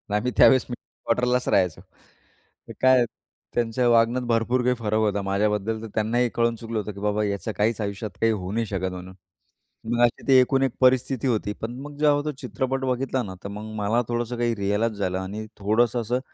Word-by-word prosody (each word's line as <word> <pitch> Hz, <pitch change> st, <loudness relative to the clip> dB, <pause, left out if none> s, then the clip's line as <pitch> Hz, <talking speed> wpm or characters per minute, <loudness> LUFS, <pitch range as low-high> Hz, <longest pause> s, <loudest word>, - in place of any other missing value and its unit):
आम्ही 125 Hz, +4 st, 0 dB
त्यावेळेस 130 Hz, -2 st, +6 dB
आम्ही -, -, -13 dB
मिलिट्री 120 Hz, -, -11 dB
क्वार्टरलाच 125 Hz, +1 st, +1 dB
राहायचो, 90 Hz, -4 st, +1 dB, 0.9 s
तर -, -, -8 dB
काय 130 Hz, -1 st, +5 dB, 0.5 s
त्यांच्या 120 Hz, +1 st, +1 dB
वागण्यात 120 Hz, +2 st, +3 dB
भरपूर 120 Hz, +2 st, +1 dB
काही 125 Hz, 0 st, +2 dB
फरक 110 Hz, -1 st, -1 dB
होता. 105 Hz, -2 st, +1 dB
माझ्याबद्दल 105 Hz, +2 st, 0 dB
तर 115 Hz, -, -5 dB
त्यांनाही 120 Hz, +3 st, +1 dB
कळून 115 Hz, 0 st, +2 dB
चुकलं 115 Hz, 0 st, -5 dB
होतं, 105 Hz, -, -4 dB
की 100 Hz, -, -10 dB
बाबा 105 Hz, +1 st, 0 dB
ह्याचं 100 Hz, +2 st, -2 dB
काहीच 110 Hz, +1 st, +1 dB
आयुष्यात 100 Hz, +1 st, -4 dB
काही 115 Hz, 0 st, +4 dB
होऊ 95 Hz, -3 st, -3 dB
नाही 115 Hz, +1 st, 0 dB
शकत 95 Hz, -2 st, -3 dB
म्हणून. 90 Hz, 0 st, -9 dB, 0.8 s
मग 120 Hz, 0 st, +1 dB
अशी 120 Hz, -, +1 dB
ती 135 Hz, -, +5 dB
एकूण 135 Hz, +1 st, +2 dB
एक 135 Hz, -, +1 dB
परिस्थिती 130 Hz, 0 st, +3 dB
होती, 110 Hz, -4 st, 0 dB
पण 115 Hz, +2 st, -4 dB
मग 145 Hz, 0 st, -9 dB
जेव्हा 145 Hz, -1 st, +3 dB
तो 150 Hz, -, -1 dB
चित्रपट 135 Hz, -1 st, -2 dB
बघितला 130 Hz, 0 st, -1 dB
ना 95 Hz, -, -7 dB
तर -, -, -4 dB
मग 105 Hz, +1 st, -7 dB
मला 110 Hz, +3 st, +1 dB
थोडंसं 120 Hz, 0 st, -2 dB
काही 120 Hz, -1 st, 0 dB
रिअलाईज 105 Hz, +2 st, 0 dB
झालं 95 Hz, -2 st, -1 dB
आणि 100 Hz, +3 st, -5 dB
थोडंसं 115 Hz, +4 st, +1 dB
असं 120 Hz, +3 st, -1 dB
115 Hz, 200 wpm, -24 LUFS, 105-125 Hz, 0.9 s, त्यावेळेस